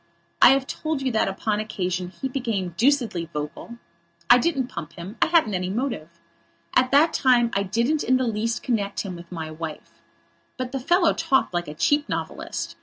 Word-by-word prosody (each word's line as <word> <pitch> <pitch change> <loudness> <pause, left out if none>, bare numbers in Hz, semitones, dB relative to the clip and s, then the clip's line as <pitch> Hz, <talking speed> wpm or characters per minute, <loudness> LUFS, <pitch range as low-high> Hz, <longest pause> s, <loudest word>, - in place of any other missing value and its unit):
I - - +10
have 270 -1 0
told 310 0 -3
you 260 - 0
that, 220 - +1
upon 210 +2 -1
that 215 - -2
occasion, 185 -3 -3
he 185 +9 -5
became 230 -9 -2
deucedly 230 - +1
vocal. 150 +10 -6 0.5
I 245 - +8
didn't 275 -2 0
pump 170 - -8
him. 180 +5 -8
I - - +5
hadn't 320 -10 +3
any 180 0 -1
motive. 230 - -3 0.7
At 255 0 +4
that 300 +4 +4
time 240 -3 +3
I 200 - +1
didn't 235 +10 0
in 255 - +3
the 260 - 0
least 230 +1 -2
connect 205 -5 -1
him 190 -3 -6
with 170 0 -12
my 160 -3 -5
wife. 155 -1 -8 0.6
But 255 -1 -4
the 270 - -2
fellow 345 +6 +3
talked 290 - +1
like 175 0 -1
a 150 - -7
cheap 290 - +1
novelist. - - -4
230 Hz, 190 wpm, -24 LUFS, 180-265 Hz, 0.7 s, I